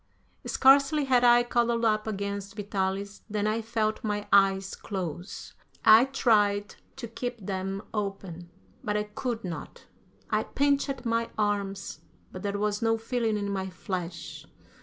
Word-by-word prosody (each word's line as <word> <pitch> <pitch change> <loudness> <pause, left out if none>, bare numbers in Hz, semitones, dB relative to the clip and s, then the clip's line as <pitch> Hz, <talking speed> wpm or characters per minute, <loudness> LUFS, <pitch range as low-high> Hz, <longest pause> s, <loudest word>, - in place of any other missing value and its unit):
Scarcely 280 +2 +5
had 250 -2 +3
I 240 0 +6
cuddled 235 -1 +1
up 215 0 +1
against 200 -1 -4
Vitalis 200 -1 -3
than 210 0 -1
I 215 +2 0
felt 220 -1 -1
my 210 -1 -2
eyes 195 -1 +4
close. 180 -2 -6 0.3
I 220 +3 +8
tried 210 -6 +2 0.2
to 255 -3 -6
keep 245 +2 -5
them 195 +1 -3
open, 195 -5 -4 0.3
but 210 0 0
I 210 - 0
could 225 +2 -4
not. 175 -3 -7 0.5
I - - +2
pinched 280 -2 0
my 230 0 0
arms, 200 -2 -2 0.3
but 185 - -8
there 200 +1 -2
was 210 +1 -1
no 225 0 +2
feeling 225 -1 -1
in 200 -1 -2
my 190 -1 -2
flesh. 180 -1 -6
210 Hz, 140 wpm, -28 LUFS, 195-230 Hz, 0.5 s, I